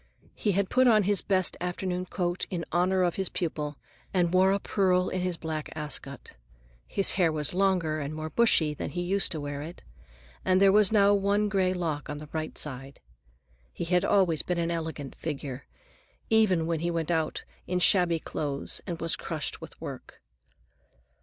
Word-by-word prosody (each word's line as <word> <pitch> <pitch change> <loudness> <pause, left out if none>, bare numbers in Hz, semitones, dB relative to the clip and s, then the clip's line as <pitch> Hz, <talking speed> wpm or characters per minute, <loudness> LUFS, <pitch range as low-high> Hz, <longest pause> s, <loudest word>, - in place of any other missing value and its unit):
He 205 - 0
had 195 +1 0
put 255 0 +4
on 215 -3 +5
his 200 0 +3
best 185 -2 +1
afternoon 180 0 -3
coat 175 0 -2
in 170 -2 -3
honor 185 +2 +2
of 175 -2 0
his 190 -2 -1
pupil, 150 -4 -3 0.3
and 175 -2 +1
wore 190 +1 +5
a 200 - +2
pearl 185 -2 +1
in 185 - -2
his 180 -2 -1
black 155 -2 -4
ascot. 150 -4 -6 0.5
His 195 - +3
hair 175 -4 +2
was 150 -1 -1
longer 180 -5 +1
and 145 +1 -4
more 155 0 -5
bushy 170 -10 +3
than 150 - -5
he 175 +4 -3
used 195 +3 +1
to 160 - -3
wear 145 -1 -5
it, 165 +4 -9 0.6
and 185 0 +3
there 195 0 +6
was 210 0 +4
now 205 -2 +5
one 205 +1 +1
gray 190 -2 +2
lock 165 -5 -3
on 145 - -4
the 150 0 -10
right 155 -1 -4
side. 135 -1 -4 0.7
He - - -5
had 180 +1 +2
always 185 -6 +3
been 180 - -2
an 170 0 0
elegant 160 -4 -4
figure, 140 -4 -6 0.6
even 200 -7 +4
when 165 -1 -1
he 170 +2 -1
went 165 -1 -2
about 160 -2 -1 0.2
in 180 - 0
shabby 180 -2 +4
clothes 145 -3 -4
and 170 -3 -4
was 165 -1 +1
crushed - - -4
with - - -11
work. - - -9
175 Hz, 185 wpm, -28 LUFS, 155-190 Hz, 0.7 s, there